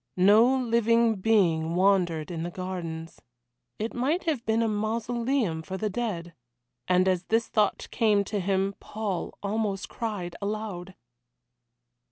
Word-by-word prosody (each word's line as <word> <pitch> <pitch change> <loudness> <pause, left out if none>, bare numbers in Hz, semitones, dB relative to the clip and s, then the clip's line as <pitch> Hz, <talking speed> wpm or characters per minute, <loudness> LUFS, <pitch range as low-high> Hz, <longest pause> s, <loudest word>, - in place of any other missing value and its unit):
No 215 +8 +6
living 230 -1 +3
being 175 -6 +2
wandered 180 -4 +2
in 165 -2 -4
the 170 - -3
gardens. 175 -3 -6 0.6
It 220 +2 -3
might 285 +9 0
have 300 -8 -1
been 225 +1 +2
a - - +1
mausoleum 225 -2 -1
for 190 +4 -6
the 215 +1 -2
dead. 185 -7 -3 0.5
And 185 +1 +3
as 185 -1 +1
this 225 +1 +1
thought 210 -3 +1
came 210 -4 +3
to 205 +1 -3
him 195 +1 0
Paul 205 -5 -4
almost 200 -1 -2
cried 200 -7 -4
aloud. 200 -3 -4
205 Hz, 135 wpm, -27 LUFS, 180-225 Hz, 0.6 s, No